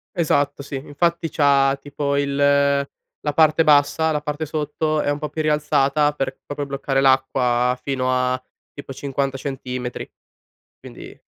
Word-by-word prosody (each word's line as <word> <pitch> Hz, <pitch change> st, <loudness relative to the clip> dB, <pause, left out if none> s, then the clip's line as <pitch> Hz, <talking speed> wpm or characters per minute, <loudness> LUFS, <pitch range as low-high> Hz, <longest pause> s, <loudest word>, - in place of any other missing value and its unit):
Esatto 145 Hz, -4 st, 0 dB
sì, 140 Hz, -, -7 dB
infatti 165 Hz, +5 st, -1 dB
c'ha 140 Hz, -2 st, +3 dB
tipo 140 Hz, 0 st, -3 dB
il 140 Hz, -1 st, -1 dB
la 140 Hz, +1 st, 0 dB
parte 155 Hz, +1 st, +4 dB
bassa, 150 Hz, +2 st, +3 dB
la 150 Hz, -, -1 dB
parte 150 Hz, +1 st, -3 dB
sotto 155 Hz, 0 st, -1 dB
è -, -, -1 dB
un 145 Hz, 0 st, -1 dB
po' 150 Hz, -, -4 dB
più 155 Hz, +2 st, -3 dB
rialzata 150 Hz, -1 st, +2 dB
per 135 Hz, -2 st, -3 dB
proprio 145 Hz, 0 st, -4 dB
bloccare 140 Hz, -1 st, -1 dB
l'acqua, 130 Hz, -2 st, +2 dB
fino 130 Hz, -1 st, -2 dB
a 125 Hz, 0 st, 0 dB, 0.3 s
tipo 140 Hz, -1 st, -9 dB
50 135 Hz, 0 st, -3 dB
centimetri, 125 Hz, -2 st, -5 dB, 0.7 s
quindi -, -, -12 dB
140 Hz, 145 wpm, -21 LUFS, 135-150 Hz, 0.7 s, parte